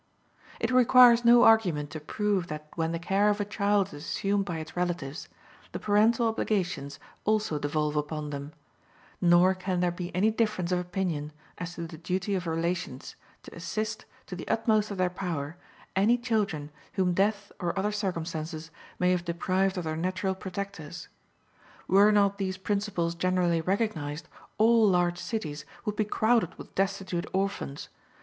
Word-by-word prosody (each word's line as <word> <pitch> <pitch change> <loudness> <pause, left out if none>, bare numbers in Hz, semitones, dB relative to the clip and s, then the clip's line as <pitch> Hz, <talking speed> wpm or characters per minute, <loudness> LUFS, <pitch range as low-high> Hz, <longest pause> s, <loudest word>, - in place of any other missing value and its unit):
It 230 - 0
requires 250 -1 +7
no 240 +1 +7
argument 180 -10 +4
to 155 - -5
prove 195 +3 -1
that 150 -1 -6
when 165 -1 -1
the 170 - -1
care 195 +4 +2
of 205 0 +1
a 205 - 0
child 200 -1 +1
is 145 0 -9
assumed 200 +3 0
by 175 -4 -3
its 155 0 -8
relatives, 175 -5 -3 0.4
the - - -3
parental 220 +3 +3
obligations 180 -11 -1 0.3
also 215 -8 +1
devolve 150 +1 -1
upon 150 0 -2
them; 140 +1 -6 0.7
nor 175 +1 +5
can 185 -1 -2
there 175 0 +2
be 175 0 -5
any 205 +4 +3
difference 215 -6 0
of 180 - +2
opinion 175 -4 -3 0.3
as 180 0 -5
to 170 - -5
the 160 -1 -10
duty 180 +3 -2
of 180 -2 -2
relations 165 -4 -3 0.3
to - - -12
assist, 215 +6 -4 0.2
to 185 - -7
the 180 - -8
utmost 220 -2 +2
of 200 - -5
their 185 0 +2
power, 170 -5 -4 0.4
any 210 +6 +4
children 210 -11 -1 0.2
whom 185 -2 +1
death 200 +2 0
or 175 0 -2
other 205 +2 +1
circumstances 165 -5 -4 0.3
may 180 0 +2
have 180 -1 +1
deprived 185 +3 0
of 180 - -2
their 155 -1 -2
natural 185 +3 -1
protectors. 190 -4 -7 0.8
Were 200 +2 +6
not 200 -1 +3
these 190 -1 -2
principles 195 -3 -1
generally 175 -1 +1
recognized, 165 -5 -2 0.3
all 225 -1 +5
large 175 -1 +2
cities 155 -11 -4 0.2
would 210 - -2
be 215 - +1
crowded 220 -3 +2
with - - -11
destitute 190 -2 -1
orphans. 190 -7 -2
185 Hz, 160 wpm, -28 LUFS, 165-205 Hz, 0.8 s, requires